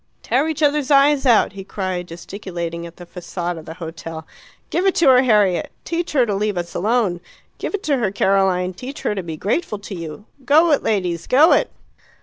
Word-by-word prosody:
"Tear 265 +6 +1
each 315 -1 -2
other's 290 -2 +2
eyes 280 -1 +4
out!" 235 -4 +4
he 195 -1 -8
cried, 185 -2 -4
gesticulating 170 -1 -6
at 170 - -14
the 175 - -10
facade 175 0 -5
of 155 - -13
the 160 - -8
hotel. 165 -1 -7 0.5
"Give 365 +3 +1
it 380 - +2
to 330 - +3
her, 255 -1 +7
Harriet! 210 -8 +2
Teach 340 -1 -3
her 260 -4 +4
to 210 - -2
leave 205 -1 -1
us 175 0 -4
alone. 205 -3 0 0.4
Give - - -3
it 410 - -6
to 285 -3 +1
her, 225 -6 0
Caroline! 190 -2 +1
Teach 255 +10 -8
her - - 0
to 195 - -3
be 165 -3 -6
grateful 210 - -1
to 205 0 -9
you. 170 +2 -7 0.2
Go 310 +5 +4
it, 290 - +3
ladies; 180 -6 -1
go 295 +6 +6
it!" - - +3
200 Hz, 205 wpm, -20 LUFS, 175-270 Hz, 0.5 s, her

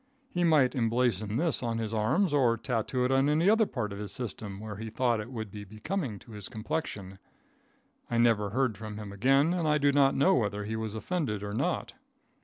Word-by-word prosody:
He 175 - 0
might 150 -6 +4
emblazon 115 -3 +1
this 160 0 0
on 115 -2 -1
his 110 -1 -3
arms, 140 - +1
or 125 -5 +3
tattoo 125 +2 -1
it 125 - +1
on 135 +2 +3
any 155 +4 +2
other 220 0 +5
part 105 -6 -3
of 100 - -7
his 105 -2 -5
system 105 -3 -5
where 105 -1 -7
he 110 +1 -6
thought 120 0 +1
it 105 +4 -6
would 110 -5 -5
be 105 -1 -7
becoming 110 - -4
to 115 - -15
his 105 -2 -8
complexion. 110 -5 -4 0.9
I 120 - 0
never 115 -3 +3
heard 120 -2 0
from 110 -1 -6
him 105 -2 -7
again, 135 - +3
and 170 -3 0
I 150 0 +4
do 145 -1 +3
not 140 -1 +4
know 140 - +4
whether 105 -3 0
he 110 +2 -3
was 110 -1 -4
offended 110 - -2
or 100 0 -4
not. - - -1
115 Hz, 210 wpm, -29 LUFS, 105-140 Hz, 0.9 s, other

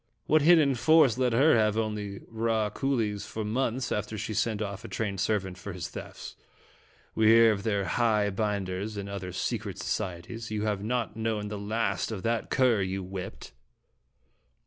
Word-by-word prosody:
What 155 +1 +4
hid 170 +4 +7
den 145 -4 +4
force 135 -2 +4
let 125 -1 +2
her 135 +6 +5
have 110 -1 +2
only 105 -3 -3
raw 110 -2 0
coolies 110 -6 -1
for 110 -1 -4
months 125 +2 -1
after 105 +1 -2
she 110 +2 -4
sent 110 0 0
off 100 -2 -4
a - - -7
trained 100 -4 -3
servant 95 -2 -1
for 100 0 -7
his 90 -2 -5
thefts? - - -9 0.8
We 110 -1 +3
hear 115 0 +7
of 100 -2 -2
their 100 -2 0
'high 105 +1 +2
binders' 100 0 -2
and 100 0 -4
other 95 -2 -5
secret 100 +1 -3
societies. 95 +4 -4
You 105 -1 -2
have 105 -2 -1
not 115 -1 -2
known 110 -2 -2
the 105 -1 -5
last 110 +3 -1
of 100 -4 -5
that 115 -1 -1
cur 125 -6 +3
you 95 0 -2
whipped." 95 0 -7
110 Hz, 175 wpm, -28 LUFS, 100-115 Hz, 0.8 s, hid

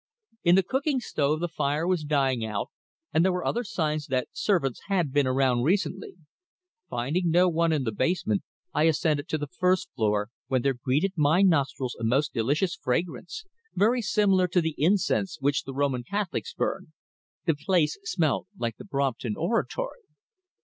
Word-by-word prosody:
In 175 0 +6
the 195 - +4
cooking 265 - 0
stove 155 - -1
the 175 - 0
fire 155 -1 -1
was 180 -3 +1
dying 135 -5 +1
out, 105 -2 -3 0.4
and 160 - +4
there 190 - +3
were 180 0 -2
other 240 - 0
signs 155 -7 -2
that 130 -2 -1
servants 165 - 0
had 180 -8 +1
been 145 -1 +2
about 130 -2 +2
recently. 185 +6 -1 0.7
Finding 155 +9 -1
no 175 +3 +5
one 170 -1 +2
in 150 -4 +1
the 115 - -1
basement 110 - 0 0.3
I 150 +1 +3
ascended 155 -1 +1
to 155 - -1
the 150 - -3
first 180 +4 0
floor, 105 -2 0 0.2
when 130 -2 0
there 135 - +2
greeted 135 +10 0
my 155 +5 +4
nostrils 140 -7 +1
a - - -6
most 130 +6 +1
delicious 145 - 0
fragrance, 170 - -3 0.3
very 235 +5 +3
similar 195 -3 +3
to 180 +1 +2
the 160 -2 -1
incense 190 +3 +1
which 140 +1 0
the 135 - -6
Roman 135 -3 0
Catholics 200 +7 -3
burn. 155 - -3 0.5
The 165 - +3
place 155 0 +1
smelt 165 -8 0
like 115 -2 -3
the - - -10
Brompton 135 - -1
Oratory." 480 - -2
155 Hz, 170 wpm, -27 LUFS, 135-180 Hz, 0.7 s, In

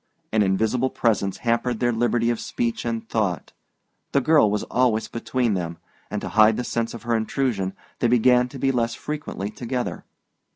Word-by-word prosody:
An 110 - +3
invisible 110 +6 +1
presence 105 -6 0
hampered 115 0 +1
their 120 -1 +2
liberty 120 0 +1
of 120 - -2
speech 120 0 -2
and 115 -1 -3
thought. 95 -9 -1 0.6
The 140 - +5
girl 150 -5 +4
was 105 0 -1
always 120 -3 +1
between 120 -1 -1
them; 85 -3 -3 0.3
and 105 - -3
to - - -4
hide 110 0 +5
the 125 - -1
sense 115 -1 -2
of 115 - -9
her 120 0 +1
intrusion 110 -4 -1 0.3
they 120 - +2
began 125 +1 +4
to 135 - -9
be 135 +1 +1
less 115 -2 0
frequently 150 -9 -5
together. 120 +3 -4
115 Hz, 175 wpm, -24 LUFS, 110-125 Hz, 0.6 s, The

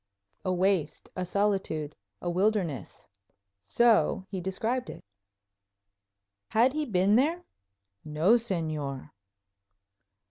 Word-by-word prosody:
"A 185 - 0
waste; 180 -4 0
a 185 - -2
solitude; 190 -7 -1 0.3
a - - -1
wilderness." 185 - -1 0.5
So 230 - +2
he 190 -2 -3
described 225 +7 -2
it. - - -9 1.5
Had 240 +4 +3
he 305 0 -1
been 195 -1 +3
there? 325 +7 +1 0.6
"No, 155 +6 +1
Señor." 155 - -2
190 Hz, 95 wpm, -28 LUFS, 160-225 Hz, 1.5 s, Had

